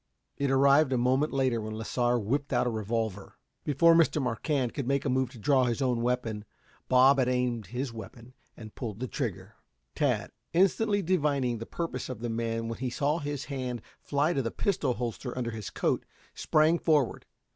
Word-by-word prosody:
It 140 -1 -1
arrived 140 +2 +5
a - - +2
moment 130 +5 +2
later 130 -4 +1
when 110 0 -5
Lasar 120 +2 0
whipped 135 +6 -1
out 125 -2 +2
a 120 - 0
revolver. 110 -2 -3 0.3
Before 160 +4 +5
Mr. 165 -2 +4
Marquand 130 0 -1
could 140 -4 -4
make 140 +1 0
a - - +1
move 130 -1 +1
to 125 - -13
draw 130 +2 +3
his 120 0 -1
own 125 -3 +1
weapon 120 -3 -1 0.5
Bob 130 +2 +6
had 130 - +2
aimed 125 -4 -1
his 125 +4 -4
weapon 115 +3 -10 0.2
and 110 -2 -10
pulled 110 -4 -6
the 130 - -3
trigger. - - -5 0.4
Tad, - - 0 0.2
instantly 200 +3 +3
divining 145 -9 +1
the 115 - -7
purpose 165 -7 -4
of 125 -4 -6
the 120 - -2
man 115 0 -2
when 115 - -5
he 130 0 -2
saw 145 +6 0
his 145 -2 -4
hand 130 -3 -4 0.2
fly 145 +4 0
to 135 - 0
the 115 - -2
pistol 140 - 0
holster 120 +1 -4
under 120 -2 -2
his 110 -2 -6
coat, - - 0 0.3
sprang 155 +2 +3
forward. 150 -7 +1
125 Hz, 190 wpm, -29 LUFS, 115-140 Hz, 0.5 s, Bob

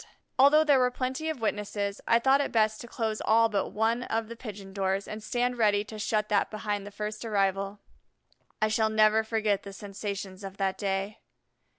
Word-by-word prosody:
Although 290 +3 +7
there 290 -3 +4
were 250 0 +4
plenty 260 +5 -3
of 305 -7 -4
witnesses, 205 -2 -2
I 230 - +5
thought 265 +4 +4
it - - -2
best 215 -1 +2
to 240 - -9
close 220 -2 -2
all 225 +1 +4
but 200 -3 0
one 225 +3 0
of 225 -2 -2
the 235 - -7
pigeon 205 -5 -9
doors 195 0 -1
and 215 +1 -6
stand 245 +2 -1
ready 205 -2 +3
to 215 0 -9
shut 210 0 0
that 205 -1 +2
behind 210 -2 -3
the - - -6
first 210 +1 -5
arrival. 195 -2 0 0.8
I 215 - +3
shall 220 0 +2
never 215 0 +4
forget 220 -2 0
the 200 - -9
sensations 200 -1 -6
of 195 0 -7
that 195 -1 -1
day. 195 +1 -2
215 Hz, 195 wpm, -28 LUFS, 200-230 Hz, 0.8 s, Although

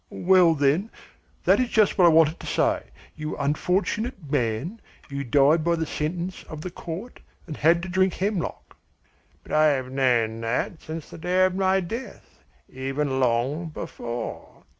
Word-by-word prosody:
"Well, 180 -2 +4
then, 150 +9 +1 0.6
that - - +5
is 250 -2 +1
just 215 -3 +3
what 185 - +5
I - - +8
wanted 160 0 +4
to - - -9
say. - - 0 0.3
You 155 0 -5
unfortunate 180 - -1
man, 140 - -1 0.3
you 140 0 -3
died 145 +5 +4
by 170 +1 +2
the 160 -1 -2
sentence 170 +5 -4
of 155 -1 -8
the 180 - -6
court 180 +8 -7 0.3
and 155 - -6
had 170 +4 +3
to - - -4
drink 185 0 +1
hemlock!" 195 -2 -3 0.7
"But - - -13
I 155 0 +5
have 130 -3 0
known 120 -4 +1
that 120 +8 -2
since 160 0 -7
the - - -9
day 180 +2 +3
of 185 - 0
my 190 0 +2
death, 230 +9 -8 0.3
even 135 +1 -2
long 130 +7 +1
before. 120 -6 -7
160 Hz, 160 wpm, -25 LUFS, 140-185 Hz, 0.7 s, I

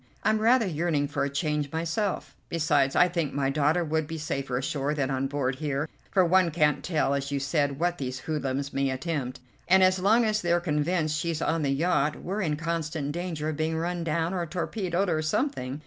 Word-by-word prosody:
I'm 215 - +3
rather 230 +2 +4
yearning 160 -4 0
for - - -1
a 140 - 0
change 145 +1 -1
myself; 170 +5 -2
besides 150 -5 +2
I 180 - +6
think 165 -6 -2
my 135 -1 +1
daughter 150 +4 +2
would 155 -1 -1
be 160 0 -5
safer 140 -4 -2
ashore 140 +2 -1
than 140 -2 -1
on 135 0 0
board 135 -2 -1
here, 150 0 -2 0.2
for 185 -2 +3
one 185 0 +4
can't 150 -3 +2
tell, 155 -5 +1
as 140 0 -2
you 140 - 0
said, 140 0 0
what 175 +1 0
these 130 -1 -4
hoodlums 140 -2 -2
may 135 0 +1
attempt; 130 -2 -3 0.3
and 190 +1 +6
as 185 0 +4
long 220 +5 +4
as 215 -1 +1
they're 175 0 +2
convinced 155 -1 0
she's 165 -1 -2
on 165 0 0
the 145 - 0
yacht 150 0 +1
we're 195 +4 -4
in 155 -5 0
constant 160 -2 -2
danger 165 -2 -3
of 155 - -4
being 160 +1 0
run 170 +1 -2
down, 165 +2 0
or 180 -2 -1
torpedoed, 185 +2 -1
or 160 -3 +1
something. 155 - -1
155 Hz, 205 wpm, -27 LUFS, 140-175 Hz, 0.3 s, I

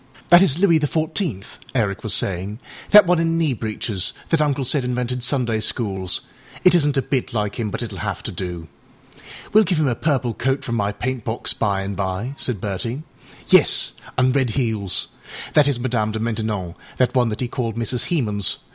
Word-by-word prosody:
âThat 175 +1 +9
is 165 -7 +4
Louis 175 -4 +4
the 150 - 0
Fourteenth,â 155 - -2 0.2
Eric 105 -5 0
was 110 - -2
saying, 95 +3 -1 0.3
âthat 210 -1 +9
one 175 -1 +3
in 165 0 +1
knee 160 -5 +1
breeches, 110 -4 -3 0.2
that 165 -2 +2
Uncle 145 -3 +1
said 135 +1 +2
invented 125 0 -2
Sunday 120 -3 0
schools. 95 -5 -2 0.4
It 180 - +6
isnât 150 -5 +3
a 135 - +2
bit 130 -3 -2
like 105 0 -2
him, 110 -2 -1
but - - -4
itâll - - -6
have - - -4
to - - -4
do.â 85 -3 -9 0.3
âWeâll 215 +1 +6
give 175 -3 +1
him 155 - +2
a 125 - +2
purple 130 -2 0
coat 135 +5 -1
from 120 - -4
my 105 -3 0
paintbox 115 +1 -2
by 100 -3 0
and 100 +1 -4
by,â 95 +6 -3
said 120 -6 -1
Bertie. 115 +8 -4 0.5
âYes, - - +5 0.3
anâ 130 +1 +3
red 130 -3 +1
heels. 110 -6 -1 0.4
That 150 -2 +5
is 140 -4 0
Madame 115 -4 -1
de 110 - -3
Maintenon, 110 -5 -2 0.2
that 125 - +2
one 125 -3 +2
he 125 - -2
called 115 -2 -3
Mrs. 115 +1 -1
Hemans. 105 - 0
120 Hz, 190 wpm, -21 LUFS, 105-140 Hz, 0.5 s, âThat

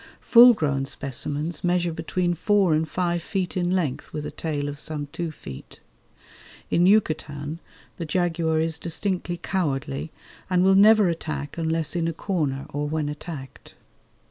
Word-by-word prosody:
Full 240 0 +8
grown 140 -6 0
specimens 145 +4 -4
measure 175 -1 +1
between 175 +2 -1
four 195 -1 +2
and 155 +1 0
five 175 -1 -1
feet 185 +1 -3
in 175 -1 0
length 180 -8 -1
with 150 -1 -5
a - - -5
tail 145 -3 -3
of 145 0 -6
some 150 -1 -4
two 170 +1 -3
feet. 70 - -11 0.9
In 175 +2 +4
Yucatan 155 -6 +1 0.4
the 170 - -4
jaguar 165 -1 0
is 160 0 0
distinctly 175 +1 -2
cowardly, 150 -5 -2 0.4
and 180 -1 +3
will 190 +1 +5
never 210 +1 +6
attack 155 -4 -3
unless 160 -1 -1
in 165 -1 0
a 165 - -1
corner 150 -7 -2
or 145 +1 -3
when 155 -1 -1
attacked. 150 -3 -8
165 Hz, 150 wpm, -24 LUFS, 150-180 Hz, 0.9 s, Full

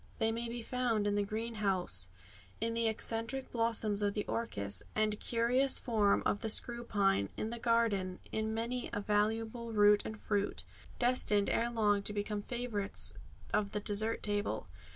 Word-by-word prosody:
They 225 -1 +1
may 230 +1 -4
be 235 0 -6
found 235 -4 -1
in 205 - +1
the 205 - +1
greenhouse, 200 - +1 0.5
in 230 +1 -1
the 230 0 0
eccentric 225 +4 -2
blossoms 225 -3 +1
of 205 -1 0
the 210 - -2
orchis, 100 - 0
and 215 -1 +1
curious 245 +3 +4
form 215 -5 +1
of 205 - 0
the 225 - -2
screw 235 +2 +1
pine 195 - +1
in 220 - -3
the 235 - -4
garden, 220 -6 0
in 220 0 -2
many 235 +3 -3
a - - -1
valuable 220 +3 -1
root 205 -1 +5
and 220 0 -7
fruit, 205 -1 0 0.3
destined 240 -5 +3
ere 235 +1 0
long 210 -3 +1
to 210 - -1
become 205 0 -3
favourites 215 - 0 0.4
of 205 -1 0
the 210 - -1
dessert 215 +2 0
table. 205 0 -1
220 Hz, 165 wpm, -33 LUFS, 205-230 Hz, 0.5 s, root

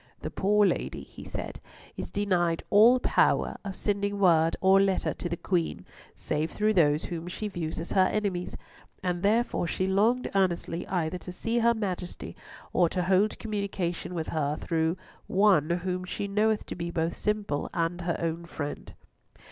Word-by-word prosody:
"The - - -4
poor 210 +1 +3
lady," - - -1
he - - -12
said, - - -6 0.4
"is - - -5
denied 175 -5 0
all 230 +5 +7
power - - +2
of 195 -2 -5
sending 200 0 -1
word 165 -4 +4
or 195 0 +5
letter 195 -1 +1
to 175 - -5
the 170 - -2
Queen 175 -2 -1 0.3
save 155 +2 -2
through 215 +1 +1
those 155 -5 +3
whom 170 0 -5
she 210 +4 -4
views 170 -6 -4
as 165 - -6
her 185 -1 +4
enemies, 195 -4 -2 0.5
and 180 -1 -1
therefore 210 -2 +1
she 185 - -1
longed 215 +7 +2
earnestly 175 -3 0
either 175 -1 -1
to 180 - -8
see 230 +6 -1
her 235 0 +4
Majesty, 185 -5 -4 0.4
or 175 -2 +4
to 180 +1 -1
hold 190 +3 +2
communication 200 -5 -3
with 160 -2 -3
her 150 -1 -1
through 165 +1 0 0.3
one 190 -6 +4
whom 180 +1 -1
she 195 +2 -4
knoweth 210 +2 +1
to - - -6
be 170 0 -4
both 165 0 -1
simple 210 -8 -1
and 170 +1 -1
her 170 -1 -1
own 165 +1 -3
friend." 145 -3 -6
185 Hz, 170 wpm, -28 LUFS, 170-205 Hz, 0.5 s, all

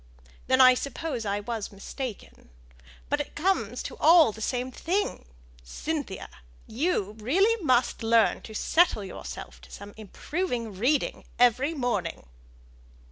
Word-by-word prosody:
Then 260 0 +3
I 255 0 +9
suppose 265 -2 -4
I 200 +1 -1
was 220 -1 -4
mistaken. 210 - -8 0.6
But 290 - 0
it 290 - -9
comes 380 +5 0
to - - -6
all 325 -5 +6
the 220 - -11
same 250 +3 -2
thing. 360 - -2 0.4
Cynthia, 285 - -4 0.4
you 230 - -1
really 390 - +2
must 250 -5 +2
learn 225 0 +3
to 220 - -10
settle 325 - +2
yourself 190 - -8
to - - -15
some 205 0 -10
improving 230 - -4
reading 255 +9 0
every 255 +6 +3
morning." 220 - -2
250 Hz, 130 wpm, -27 LUFS, 215-310 Hz, 0.6 s, I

